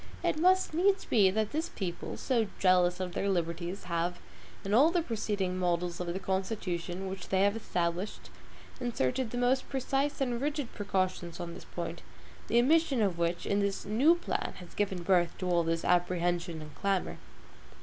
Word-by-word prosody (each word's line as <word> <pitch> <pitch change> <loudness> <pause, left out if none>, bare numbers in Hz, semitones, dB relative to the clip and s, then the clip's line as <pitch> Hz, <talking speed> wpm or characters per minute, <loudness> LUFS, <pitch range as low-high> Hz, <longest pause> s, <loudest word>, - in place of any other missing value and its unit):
It - - +1
must 370 0 +4
needs 390 +4 +2
be 200 -5 +4
that 215 +2 0
this 320 +3 -2
people, 180 -4 -5
so 235 -5 +1
jealous 180 -1 +3
of 180 -1 -3
their 200 - -1
liberties, 175 +1 -2
have, 170 +1 -1 0.5
in 200 - -1
all 275 +8 +7
the 340 -1 +1
preceding 205 - -2
models 175 -1 0
of 180 - -3
the 170 +2 -2
constitutions 190 -2 -2
which 190 -1 -6
they 190 0 +3
have 200 +1 +3
established, 180 -2 -3 0.5
inserted 240 - -1
the 245 - -4
most 250 +2 +1
precise 275 +2 -1
and 245 -3 -1
rigid 290 -3 -2
precautions 185 -4 -2
on 170 -1 -5
this - - -10
point, - - -5 0.5
the 235 - +2
omission 285 +2 +4
of 190 -6 +1
which, 170 0 0
in 200 - +1
the 200 -1 +1
new 265 +11 +5
plan, 345 - -3
has 180 -2 -11
given 190 -4 -1
birth 175 -2 +2
to 185 - -3
all 175 -1 +3
this 165 0 -1
apprehension 175 -2 +1
and 150 - -11
clamor. 195 -2 -1
190 Hz, 175 wpm, -31 LUFS, 175-240 Hz, 0.5 s, all